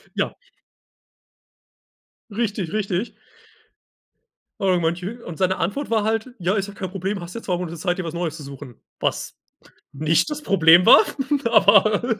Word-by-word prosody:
Ja. -, -, -2 dB, 1.9 s
Richtig, 205 Hz, -4 st, -3 dB
richtig. 200 Hz, 0 st, -1 dB, 1.5 s
Aber 185 Hz, -2 st, +2 dB
manche 175 Hz, +8 st, -3 dB
und 170 Hz, -3 st, -8 dB
seine 190 Hz, 0 st, +1 dB
Antwort 205 Hz, +12 st, -3 dB
war 220 Hz, -2 st, +1 dB
halt: 225 Hz, +3 st, -1 dB
„Ja, 185 Hz, +3 st, 0 dB
ist 195 Hz, -1 st, -1 dB
doch 205 Hz, -, -10 dB
kein 185 Hz, -, -5 dB
Problem, 195 Hz, +2 st, -3 dB
hast 175 Hz, +1 st, -9 dB
ja 230 Hz, -, -5 dB
2 180 Hz, -2 st, -1 dB
Monate 170 Hz, -1 st, -6 dB
Zeit, 180 Hz, +2 st, -1 dB
dir -, -, -2 dB
was 165 Hz, -2 st, -5 dB
Neues 165 Hz, -2 st, -3 dB
zu 150 Hz, -, -9 dB
suchen.“ 135 Hz, -3 st, -10 dB, 0.2 s
Was -, -, -3 dB, 0.6 s
nicht 155 Hz, -, +1 dB
das 300 Hz, 0 st, -5 dB
Problem 170 Hz, -, +5 dB
war, -, -, +9 dB, 0.4 s
aber 215 Hz, +1 st, +4 dB
190 Hz, 150 wpm, -22 LUFS, 170-215 Hz, 1.9 s, war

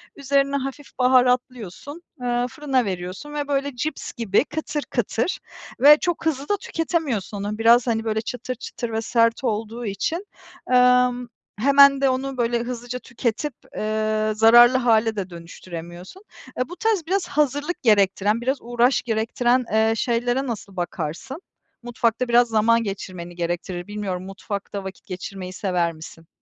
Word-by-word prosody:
Üzerine 280 Hz, 0 st, +1 dB
hafif 275 Hz, +1 st, -5 dB
baharatlıyorsun, 250 Hz, -, +1 dB, 0.2 s
eee, 245 Hz, 0 st, 0 dB
fırına 270 Hz, -4 st, 0 dB
veriyorsun 185 Hz, +9 st, -5 dB
ve 290 Hz, -1 st, -3 dB
böyle 280 Hz, -1 st, -1 dB
cips 290 Hz, +4 st, -4 dB
gibi 230 Hz, -1 st, +1 dB
kıtır 300 Hz, -1 st, -4 dB
kıtır 240 Hz, -, -1 dB, 0.4 s
ve 290 Hz, +4 st, +8 dB
çok 350 Hz, -2 st, -2 dB
hızlı 290 Hz, -3 st, -1 dB
da 410 Hz, -, +2 dB
tüketemiyorsun 285 Hz, -, -2 dB
onu. 205 Hz, +2 st, -4 dB
Biraz, 235 Hz, +2 st, +5 dB
hani, 225 Hz, -1 st, 0 dB
böyle 220 Hz, -1 st, -1 dB
çıtır 250 Hz, +2 st, -5 dB
çıtır 235 Hz, -1 st, -6 dB
ve 220 Hz, 0 st, -1 dB
sert 230 Hz, +2 st, +2 dB
olduğu 225 Hz, +1 st, -3 dB
için. 320 Hz, -, -3 dB, 0.5 s
Emm, 250 Hz, 0 st, +4 dB, 0.3 s
hemen 280 Hz, +2 st, +6 dB
de 275 Hz, -, +4 dB
onu 265 Hz, 0 st, -2 dB
böyle 235 Hz, 0 st, +1 dB
hızlıca 245 Hz, 0 st, -5 dB
tüketip, 245 Hz, +3 st, -3 dB, 0.2 s
eee, 215 Hz, 0 st, 0 dB
zararlı 240 Hz, +3 st, +7 dB
hale 225 Hz, -3 st, +2 dB
de 195 Hz, -3 st, -4 dB
dönüştüremiyorsun. 175 Hz, -, -10 dB, 0.3 s
Eee, 250 Hz, -, -1 dB
bu 355 Hz, -, -7 dB
tarz 440 Hz, -5 st, 0 dB
biraz 375 Hz, 0 st, 0 dB
hazırlık 295 Hz, +4 st, -1 dB
gerektiren, 205 Hz, 0 st, +3 dB
biraz 265 Hz, +3 st, 0 dB
uğraş 240 Hz, +2 st, +2 dB
gerektiren, 240 Hz, +2 st, +1 dB
eee, 220 Hz, +1 st, +3 dB
şeylere 245 Hz, +3 st, 0 dB
nasıl 205 Hz, -4 st, -6 dB
bakarsın? 175 Hz, -, -5 dB, 0.4 s
Mutfakta 235 Hz, 0 st, 0 dB
biraz 240 Hz, +1 st, +5 dB
zaman 230 Hz, +1 st, +3 dB
geçirmeni 185 Hz, -4 st, -6 dB
gerektirir. 175 Hz, +1 st, -4 dB
Bilmiyorum 195 Hz, -3 st, -4 dB
mutfakta 200 Hz, 0 st, -6 dB
vakit 190 Hz, 0 st, -9 dB
geçirmeyi 185 Hz, 0 st, -7 dB
sever 180 Hz, -3 st, -1 dB
misin? 160 Hz, +1 st, -12 dB
235 Hz, 145 wpm, -23 LUFS, 205-270 Hz, 0.5 s, ve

